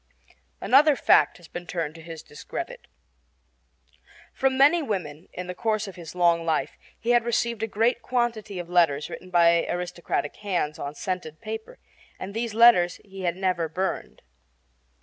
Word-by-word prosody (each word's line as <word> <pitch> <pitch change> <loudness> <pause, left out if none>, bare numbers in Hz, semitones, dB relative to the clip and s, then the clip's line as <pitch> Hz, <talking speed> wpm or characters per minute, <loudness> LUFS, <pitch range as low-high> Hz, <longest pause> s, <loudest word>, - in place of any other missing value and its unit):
Another 290 +3 +5
fact - - +4
has 175 -2 -15
been 175 0 -8
turned 165 -4 -3
to 165 - -12
his 165 -1 -9
discredit. 410 - -7 1.5
From 265 -1 +1
many 295 +6 +6
women, 180 - -4
in 180 - -6
the 180 - -5
course 215 +2 -1
of 195 - -9
his 170 -1 -10
long 170 -2 +3
life, 160 -2 -1 0.2
he 235 - 0
had 240 -1 +4
received 235 -1 -1
a 225 - 0
great 230 +3 +1
quantity 230 -5 -1
of 175 -1 -5
letters 165 -5 +2
written 185 - -8
by 170 -1 +4
aristocratic 175 -4 -3
hands 180 -7 -2
on 140 +1 -5
scented 160 -3 -4
paper, 220 - -7 0.4
and 195 +2 -6
these 225 -1 -3
letters 225 -7 +6
he 195 -1 -10
had 175 -2 0
never 180 -3 0
burned. 185 +4 -3
185 Hz, 160 wpm, -25 LUFS, 170-230 Hz, 1.5 s, many